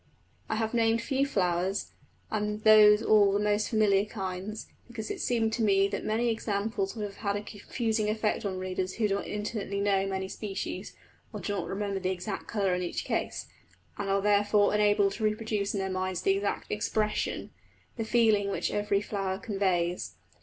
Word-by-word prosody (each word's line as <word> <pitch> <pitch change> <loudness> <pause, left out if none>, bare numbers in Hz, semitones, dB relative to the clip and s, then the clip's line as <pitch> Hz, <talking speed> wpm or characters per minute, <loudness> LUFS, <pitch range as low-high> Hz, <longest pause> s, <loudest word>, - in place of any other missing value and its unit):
I - - 0
have 220 +1 -1
named 230 -1 +3
few 270 +4 0
flowers, 185 -3 0 0.4
and 210 0 -2
those 215 -1 +7
all 205 -2 +5
the 200 - +1
most 210 0 +1
familiar 205 -3 +3
kinds, 195 0 -5 0.2
because 225 -3 -6
it - - -4
seemed 225 -2 +1
to 230 - -1
me 195 -2 +4
that 200 - -3
many 230 +2 +1
examples 210 -2 -2
would 215 - -4
have 200 -1 -8
had 200 -2 -1
a 205 - -3
confusing 215 +1 -2
effect 215 0 0
on 195 -2 -2
readers 185 0 -3
who 220 -2 +1
do 200 - 0
not 200 - -2
intimately 210 -1 -3
know 195 -1 +2
many 190 -1 -2
species, 195 0 -5 0.4
or - - -6
do 205 - -3
not 200 - -3
remember 200 0 -2
the 185 -1 -1
exact 190 +2 -4
colour 200 -4 0
in 180 - -1
each 175 - -3
case, - - -2 0.5
and 205 -1 -4
are 195 0 +2
therefore 205 0 +3
unable 205 -1 +3
to 220 - -6
reproduce 215 -1 -1
in - - -1
their 190 - -1
minds 185 -1 -2
the - - +4
exact 200 +1 -2
expression 210 0 -1 0.4
the 225 - -2
feeling 220 -3 +3
which - - -1
every 205 -1 +1
flower 195 -2 -2
conveys. 190 -4 -1
205 Hz, 185 wpm, -29 LUFS, 195-215 Hz, 0.5 s, those